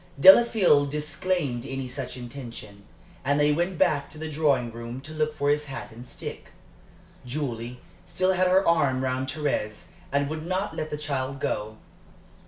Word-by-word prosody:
Delafield 190 -6 +7
disclaimed 150 -3 -1
any 135 -1 -4
such 125 0 -6
intention, 115 -5 -9 0.4
and 140 +2 +2
they 150 0 +4
went 175 +4 0
back 145 -2 +2
to 155 - -10
the 155 0 -5
drawing 140 -6 +2
room 115 +2 -7
to 155 +3 -9
look 155 -1 -1
for 145 -1 +1
his 150 0 0
hat 135 -2 -7
and 120 +3 -11
stick. - - -7 0.8
Julie 125 -2 -4 0.3
still 185 +1 +1
had 185 0 +3
her 190 +2 +4
arm 140 -6 +3
round 130 0 -1
Thérèse 140 -7 -2 0.2
and 140 0 +1
would 155 +1 -4
not 185 +4 -2
let 155 - -3
the 150 - -3
child 140 -2 -3
go. 110 -4 -2
145 Hz, 165 wpm, -26 LUFS, 125-155 Hz, 0.8 s, Delafield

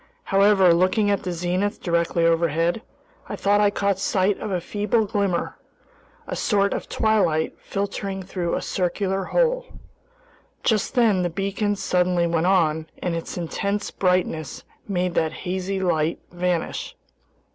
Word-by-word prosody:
However, 195 -2 +5
looking 185 +4 +2
at 200 - 0
the 180 - -3
zenith 180 +4 -1
directly 170 -1 +1
overhead, 165 +3 +1 0.5
I - - -3
thought 205 +1 +2
I 205 - +5
caught 200 -1 0
sight 195 0 +1
of - - -4
a 185 -2 0
feeble 210 +5 0
glimmer, 200 -3 -1 0.7
a - - -4
sort 200 -2 +1
of - - -5
twilight 185 -8 +1
filtering 195 -1 -4
through 180 -2 -2
a - - -3
circular 190 +1 -1
hole. - - +1 1.0
Just 220 +2 +1
then 220 -7 +4
the 175 - 0
beacon 200 +4 -1
suddenly 180 -2 +1
went 170 0 +1
on, 160 -4 +2
and 175 -2 -2
its 165 - -5
intense 200 +4 -2
brightness 180 -5 -1 0.2
made 180 -3 -1
that 160 -2 0
hazy 190 +2 -2
light 165 -3 +1
vanish. 175 -1 -2
185 Hz, 140 wpm, -23 LUFS, 175-200 Hz, 1.0 s, However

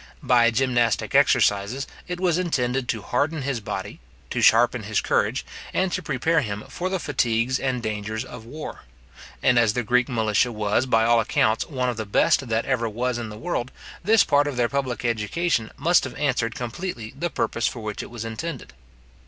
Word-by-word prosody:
By 120 -2 +5
gymnastic 120 -2 +1
exercises, 105 +7 +3 0.2
it 180 0 -4
was 180 -2 +2
intended 130 -7 -1
to 110 -3 -2
harden 145 +6 -1
his 135 -3 -1
body, 105 - -6 0.3
to - - -1
sharpen 120 +1 +5
his 110 +1 -1
courage, - - 0 0.3
and 190 -1 +1
to 185 - -1
prepare 150 +2 +1
him 105 -4 -4
for 185 +1 -3
the 190 - 0
fatigues 130 -5 0
and 130 -3 -2
dangers 110 +2 -3
of 125 -3 -10
war; 150 +7 -8 0.6
and 125 -1 +5
as 115 -3 +3
the 125 - -1
Greek 125 +4 +2
militia 110 0 +1
was, 105 +3 0
by 115 -2 +3
all 120 0 +4
accounts, 110 0 +1
one 130 -4 -1
of 120 -2 -2
the 110 -2 -4
best 125 +5 +3
that 115 0 0
ever 120 -4 0
was 120 +2 -2
in 115 -2 -5
the 105 - -9
world, 120 +2 -3 0.3
this 215 +3 +5
part 145 0 +3
of 140 -4 -4
their 120 -1 +2
public 130 -3 -2
education 115 +3 0
must 170 +5 +3
have 130 - -7
answered 125 -5 0
completely 120 -1 -5
the 175 - -2
purpose 115 - -1
for 120 - -5
which 105 -1 -4
it - - -9
was 115 -2 -6
intended. 125 - -6
120 Hz, 190 wpm, -24 LUFS, 115-140 Hz, 0.6 s, By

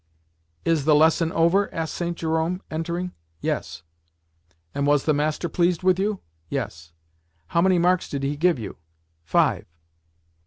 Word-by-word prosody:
"Is 160 -4 +2
the 155 -1 +5
lesson 160 +2 +4
over?" 170 +5 +2
asked 165 -2 -3
St. 170 -1 -3
Jerome, 160 +3 -1
entering. 170 +3 -3 0.3
"Yes." 80 +1 -3 0.9
"And 140 0 0
was 145 -1 +3
the 155 - +3
master 150 +3 0
pleased 175 +1 +1
with 185 0 +3
you?" 205 0 -1 0.3
"Yes." 80 +1 -4 0.6
"How 170 - +2
many 185 0 +4
marks 180 +1 +2
did 140 -1 -3
he 140 +2 -1
give 170 +2 +2
you?" 110 -5 -7 0.5
"Five." 80 - +1
165 Hz, 145 wpm, -24 LUFS, 145-180 Hz, 0.9 s, the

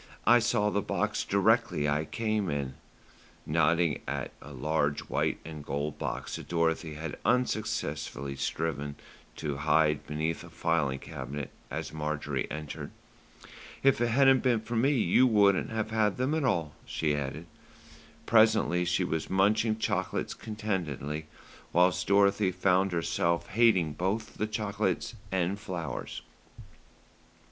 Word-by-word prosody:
"I 120 +1 +7
saw 105 -3 +1
the 100 - +1
box - - -1
directly 75 0 +2
I 75 +2 +1
came 110 -1 -1
in," 70 -3 -2 0.7
nodding 80 +1 +2
at - - -3
a 70 - -11
large 75 +2 0
white - - -1
and 80 -2 -7
gold 70 +2 -3
box - - -3
that - - -9
Dorothy 80 -2 0
had 80 0 -6
unsuccessfully 110 - -1
striven 70 +1 -2 0.4
to 75 -3 -3
hide 75 0 +2
beneath 80 +3 -2
a 85 - -11
filing 80 -4 0
cabinet 65 +1 -6 0.2
as - - -5
Marjorie 75 -2 -2
entered. 75 0 -6 0.9
"If 135 -3 +4
it 120 - +3
hadn't 135 +2 +5
been 120 -4 +2
for 115 +2 -5
me 120 +5 +3
you 125 +1 +4
wouldn't 100 -4 +4
have 110 -1 -2
had 110 -2 +1
them 130 +4 0
at 160 -3 +1
all," 80 - 0
she 75 -2 -1
added. 70 +3 -4 0.8
Presently 110 -6 +4
she 90 +2 +1
was 80 -3 -2
munching 105 +3 +2
chocolates - - -1
contentedly, 85 - -4 0.5
whilst 90 +1 +3
Dorothy 100 -1 +4
found 95 +1 +2
herself 85 0 0
hating 95 -8 +3
both 95 +8 -2
the 105 - -2
chocolates 105 -2 -1 0.2
and 95 +1 0
flowers. 85 -8 -5
85 Hz, 135 wpm, -29 LUFS, 75-110 Hz, 0.9 s, I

